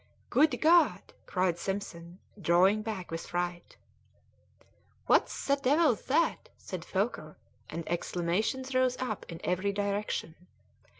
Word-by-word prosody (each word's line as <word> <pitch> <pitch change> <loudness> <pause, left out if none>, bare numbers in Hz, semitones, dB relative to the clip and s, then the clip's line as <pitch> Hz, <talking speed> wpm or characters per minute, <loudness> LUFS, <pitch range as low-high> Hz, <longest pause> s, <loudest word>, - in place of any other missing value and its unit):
"Good 295 +5 +4
God!" 335 +1 +4
cried 180 -2 0
Simpson, 180 -3 -5 0.2
drawing 185 +5 +4
back 210 -6 -5
with 165 0 -5
fright. 175 0 -4 1.3
"What - - +4
the 280 0 -1
devil's 280 -3 +3
that?" 310 +5 +1
said 185 -3 -7
Foker, 190 -7 -2 0.3
and 165 -1 -6
exclamations 180 +10 -1
rose 255 -1 +2
up 240 -5 -4
in 165 - -7
every 185 +3 0
direction. 200 -4 -2
200 Hz, 115 wpm, -30 LUFS, 175-255 Hz, 1.3 s, Good